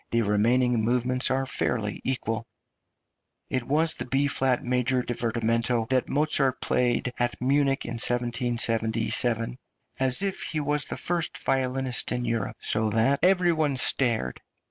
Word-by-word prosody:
The 115 0 +1
remaining 115 +3 +1
movements 125 +2 +1
are 135 +1 0
fairly 110 -5 -2
equal. 115 -3 -3 1.0
It 130 - 0
was 155 +3 +2
the - - -6
B 135 +3 +1
flat 135 -3 +1
major 125 0 0
divertimento 115 0 -1
that 130 -1 0
Mozart 145 -2 +1
played 125 0 0
at 120 0 -1
Munich 135 +1 +1
in 115 0 -5
1777, 115 -1 +1 0.4
"as 130 +6 +6
if 195 -1 -2
he 155 - -3
was 145 0 +1
the - - -5
first 175 -2 -1
violinist 130 -1 -1
in 125 0 -2
Europe," 115 -3 -3
so 110 0 0
that 115 +6 +1
"every 180 0 +3
one 150 -4 -1
stared." 120 - 0
125 Hz, 140 wpm, -25 LUFS, 115-135 Hz, 1.0 s, as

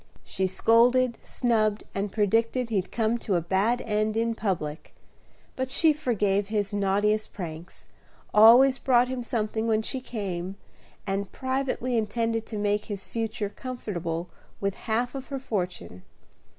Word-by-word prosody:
She 190 - -1
scolded, 235 +5 +3
snubbed, 215 -4 0
and 200 0 -2
predicted 230 +4 +1
he'd 195 -5 -1
come 230 +1 0
to 200 - -1
a - - +3
bad 195 +8 +1
end 215 0 0
in 230 0 +1
public; 175 -8 -3 0.6
but 260 0 -2
she 315 +3 +4
forgave 205 -8 0
his 205 -1 -1
naughtiest 205 +2 +1
pranks, 170 -2 -8 0.5
always 245 +5 +7
brought 250 -1 +3
him 255 -1 -3
something 225 -1 -2
when 220 -1 +2
she 260 +3 -3
came, 195 -6 -4 0.5
and 195 0 -2
privately 260 -2 -1
intended 225 +1 -1
to 215 - -5
make 205 0 0
his 200 -3 -6
future 225 -2 -3
comfortable 180 -9 -4 0.3
with 200 -1 -1 0.2
half 240 +3 0
of 270 -1 -6
her 275 - -4
fortune. 180 - -4
220 Hz, 140 wpm, -27 LUFS, 200-240 Hz, 0.6 s, always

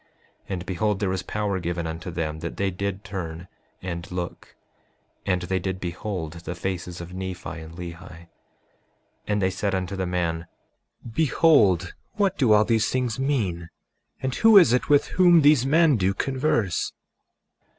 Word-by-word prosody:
And 90 -2 -4
behold, 100 +2 -1
there 100 -3 0
was 95 -1 -1
power 105 -1 -2
given 85 -1 -3
unto 80 +2 -5
them 80 -2 -3
that 85 +1 -6
they 100 -1 0
did 100 +2 -4
turn 90 -5 -6 0.4
and 85 -1 -5
look; 90 -1 -6 0.7
and 90 -2 +1
they 95 +1 -1
did 95 0 -3
behold 90 -2 -4
the 85 +1 -7
faces 90 0 -4
of 85 +1 -9
Nephi 95 -1 -5
and 80 +1 -10
Lehi. 85 -1 -6
5:38 85 0 -13 1.0
And 105 -1 0
they 95 - +2
said 100 +1 -1
unto 95 +1 -3
the 95 -1 -2
man: 85 -2 -2 0.7
Behold, 110 - +3 0.2
what 200 -2 +1
do 125 - +2
all 105 0 +6
these 115 -1 +2
things 125 -3 -1
mean, 100 - -1 0.5
and 130 -1 -1
who 225 - +6
is 170 -10 +7
it 125 - +1
with 145 -1 +5
whom 175 -3 +5
these 145 -3 +5
men 155 -2 +4
do 95 0 +1
converse? 130 - 0
95 Hz, 160 wpm, -25 LUFS, 85-115 Hz, 1.0 s, is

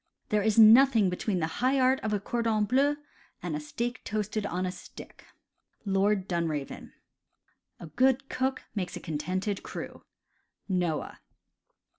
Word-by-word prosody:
"There 210 0 +2
is 215 +1 +1
nothing 225 -2 +7
between 180 0 -2
the - - +2 0.2
high 265 +2 +3
art 260 +1 +3
of 220 - -3
a 210 - 0
cordon 225 0 0
bleu 275 +6 +2 0.5
and 170 -4 -3
a - - -2
steak 235 +11 -4
toasted 210 0 -2
on 180 +1 -2
a 180 - -2
stick." 180 - -13 0.3
— - - -44
Lord 195 0 +2
Dunraven. 160 -6 -3 0.9
"A - - -8
good 260 - +1
cook 260 0 -2
makes 190 -4 -4
a - - -5
contented 185 +6 -3
crew." - - -8 0.4
— - - -51
Noah. 180 -5 -2
210 Hz, 150 wpm, -28 LUFS, 180-240 Hz, 0.9 s, nothing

